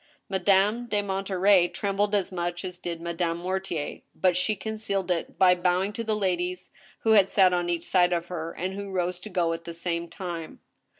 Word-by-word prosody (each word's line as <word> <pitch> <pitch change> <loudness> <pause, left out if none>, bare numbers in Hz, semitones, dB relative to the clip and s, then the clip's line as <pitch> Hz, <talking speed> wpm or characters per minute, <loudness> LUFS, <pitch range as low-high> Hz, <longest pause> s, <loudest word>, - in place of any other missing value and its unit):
Madame 200 +5 +2
de 205 -2 0
Monterey 195 -1 +3
trembled 200 +3 -1
as 200 -1 0
much 175 0 -3
as 180 -1 -6
did 170 -1 -4
Madame 170 0 -2
Mortier; 180 -4 -3
but 185 -2 +2
she 210 +4 +1
concealed 200 -3 -2
it 170 -2 -2
by 185 -1 +6
bowing 180 +3 +1
to 230 - -4
the 220 -1 0
ladies 180 -3 -2 0.3
who 225 - +2
had 200 -3 +6
sat 185 -2 +5
on 175 -1 0
each 170 -1 -1
side 180 -1 +3
of 170 -1 0
her, 165 -2 -5
and 185 +3 -4
who 200 0 -6
rose 180 -1 -1
to 215 - -9
go 175 -4 +1
at 165 0 -7
the 170 - -7
same 170 0 -2
time. 170 -2 -6
180 Hz, 195 wpm, -27 LUFS, 175-195 Hz, 0.3 s, by